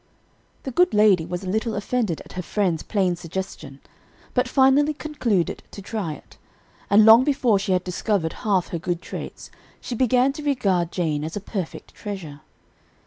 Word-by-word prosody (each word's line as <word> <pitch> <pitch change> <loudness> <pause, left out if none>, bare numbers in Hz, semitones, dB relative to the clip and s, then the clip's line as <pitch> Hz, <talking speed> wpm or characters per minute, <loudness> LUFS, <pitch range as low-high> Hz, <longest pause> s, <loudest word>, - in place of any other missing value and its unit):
"The 265 - -4
good 360 +1 +3
lady 200 -6 +4
was 180 +2 -4
a - - -6
little 220 +3 -1
offended 205 -4 -1
at - - -14
her 180 - -3
friend's 180 -3 -1
plain 190 -4 0
suggestion; 165 -5 -7 0.5
but 250 0 +1
finally 275 +3 +4
concluded 240 - -1
to - - -10
try 195 -5 -4
it; - - -15 0.5
and 210 +2 +6
long 225 +3 +9
before 255 -7 +2
she 195 -1 0
had 180 -1 +1
discovered 180 -2 -1
half 195 -5 +1
her 170 - -3
good 175 +1 -3
traits, - - -8 0.3
she - - -6
began 255 +2 +3
to 300 +1 -8
regard 195 - +1
Jane 155 -5 -1
as 160 +1 -5
a - - -2
perfect 195 -4 -6
treasure. 175 -9 -7
200 Hz, 170 wpm, -23 LUFS, 175-245 Hz, 0.5 s, long